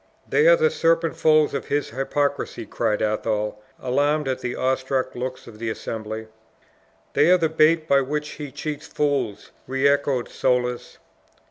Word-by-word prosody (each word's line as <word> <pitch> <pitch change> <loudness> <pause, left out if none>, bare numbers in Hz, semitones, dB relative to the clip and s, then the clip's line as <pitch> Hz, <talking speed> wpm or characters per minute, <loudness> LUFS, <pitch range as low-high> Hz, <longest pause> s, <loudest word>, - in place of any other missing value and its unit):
"They 450 +2 +3
are - - +8
the 470 -1 +2
serpent 165 0 +1
folds 155 -1 +3
of 140 - -3
his 145 0 -1
hypocrisy!" 140 +3 -2
cried 105 - -1
Athol, 105 0 -1 0.2
alarmed 145 +3 +1
at 130 -1 -1
the 125 -1 -4
awe 130 +1 +1
struck 130 0 -2
looks 130 +1 -5
of 110 -2 -13
the 115 0 -2
assembly. 110 0 -5 0.9
"They 155 - +4
are 185 - +7
the 165 -3 +1
baits 160 0 +3
by 140 -2 +4
which 150 +2 -3
he 145 -3 -7
cheats 150 +2 -5
fools!" 135 -8 -1 0.2
re 135 +2 +2
echoed 140 -3 +1
Soulis. 125 -1 -1
135 Hz, 160 wpm, -23 LUFS, 125-150 Hz, 0.9 s, are